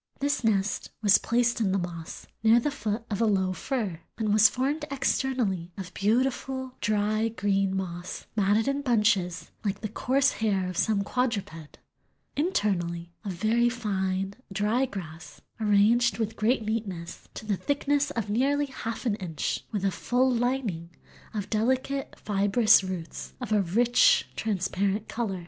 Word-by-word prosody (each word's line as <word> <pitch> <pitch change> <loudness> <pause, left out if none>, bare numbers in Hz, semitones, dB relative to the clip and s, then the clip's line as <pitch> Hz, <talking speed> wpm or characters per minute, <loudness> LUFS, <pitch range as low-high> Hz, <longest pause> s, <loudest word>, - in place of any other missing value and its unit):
This 285 -2 0
nest 205 -2 0
"was 205 -1 +6
placed 240 0 +1
in 200 -4 +2
the 195 - +2
moss, 170 -3 -6 0.2
near 225 +1 +6
the 290 +5 -1
foot 225 -5 -3
of 205 - -1
a 225 - +4
low 190 -3 +1
fir, 210 - -3 0.2
and 215 -2 0
was 215 0 +7
formed 280 +5 -1
externally 250 -10 0
of 185 -2 -7
beautiful 260 +4 0
dry 215 +1 +1
green 195 -3 0
moss, 175 -1 -5
matted 210 +3 +2
in 275 +1 0
bunches, 210 -8 +1
like 200 -2 -2
the 215 - -2
coarse 265 +6 +2
hair 200 -4 0
of 185 - -5
some 200 +2 +1
quadruped; 200 - -3 0.6
internally 175 - -1
of 200 -3 -3
very 225 +6 +2
fine, 195 -5 -2 0.2
dry 215 +7 +1
grass, 160 -7 -9 0.2
arranged 215 +1 +3
with 220 -1 -2
great 225 +1 +1
neatness, 195 -6 -4
to - - -7
the 210 -2 +1
thickness 285 +4 0
of 230 -8 -3
nearly 275 +7 +1
half 230 -3 -6
an 230 - +2
inch, 170 -6 -3
with 200 -2 -2
a 195 - +2
full 255 +6 +1
lining 235 -9 -1 0.5
of 205 -2 -2
delicate 260 +5 0
fibrous 205 +1 +4
roots 185 -3 -6
of 245 -4 -6
a 210 -1 +4
rich 240 - +4
transparent 200 0 -1
color." 215 -6 -3
215 Hz, 150 wpm, -27 LUFS, 195-245 Hz, 0.6 s, was